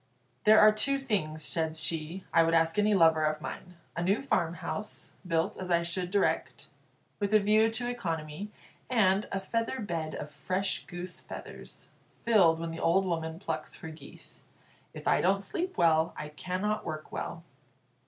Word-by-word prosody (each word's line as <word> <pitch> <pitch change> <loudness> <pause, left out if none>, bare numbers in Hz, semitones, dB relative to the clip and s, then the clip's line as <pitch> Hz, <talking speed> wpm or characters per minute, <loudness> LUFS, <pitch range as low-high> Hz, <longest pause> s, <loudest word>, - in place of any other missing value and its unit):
"There 215 +1 +8
are 215 0 +8
two 275 +6 +1
things," 185 - -2
said 160 -1 0
she, 160 +3 -2
"I 165 - +6
would 165 0 +3
ask 165 0 +3
of 210 - +3
any 210 0 +3
lover 160 -3 +5
of 155 0 +1
mine: 180 +3 -7 0.2
a 170 - -2
new 195 +8 +1
farmhouse, 175 -1 -2 0.2
built 165 +4 0
as 185 -1 -6
I 170 -1 +3
should 175 +1 -3
direct, 200 +1 0 0.5
with 205 +1 +1
a - - +8
view 215 +2 +4
to 230 +2 -2
economy; 165 -5 -4 0.4
and 210 -4 +3
a 195 - -1
feather 230 +6 -2
bed 165 -7 -3
of 150 - -6
fresh 185 +7 -2
goose 180 0 -7
feathers, - - -10 0.3
filled 185 -8 +5
when 165 0 -4
the 165 - -6
old 190 +4 +3
woman 165 -2 -2
plucks 160 -4 -4
her 160 - -8
geese. 155 - -10 0.5
If - - -8
I - - +4
don't 195 +2 +2
sleep 355 - -3
well, 165 -2 +3
I 150 - -5
cannot 185 +7 -2
work 155 -1 -6
well." 165 - -5
180 Hz, 175 wpm, -30 LUFS, 160-210 Hz, 0.5 s, There